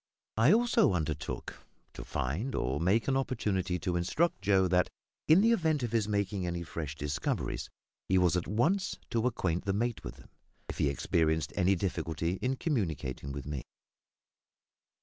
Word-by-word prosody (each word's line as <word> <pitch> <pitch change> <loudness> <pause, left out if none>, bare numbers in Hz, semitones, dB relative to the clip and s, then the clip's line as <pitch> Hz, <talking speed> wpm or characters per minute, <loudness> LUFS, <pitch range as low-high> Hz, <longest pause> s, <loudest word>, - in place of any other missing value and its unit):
I 115 +6 +6
also 235 - +4
undertook 80 -3 -3 0.3
to - - -7
find 90 - -2
or 65 +4 -1
make 95 +7 +2
an 135 - +2
opportunity 100 -9 0
to 90 - -1
instruct 95 - +1
Joe 95 -1 +3
that, 90 -1 +2 0.4
in 160 +5 +7
the 230 +2 +4
event 160 - +2
of 120 - -2
his 110 -3 +1
making 100 -3 -1
any 85 0 -3
fresh 80 -3 -5
discoveries, 75 0 -2 0.4
he 95 - +4
was 90 -1 +3
at 90 - -1
once 160 - +1
to 115 +1 +2
acquaint 90 -8 -1
the 100 - +1
mate 115 +2 -1
with - - -7
them, - - -17 0.4
if - - -6
he 70 - +3
experienced 80 +1 0
any 95 +1 +3
difficulty 85 -1 -2
in 130 +1 0
communicating 80 - -2
with 70 -1 -6
me. 75 -2 -4
95 Hz, 165 wpm, -31 LUFS, 80-120 Hz, 0.4 s, in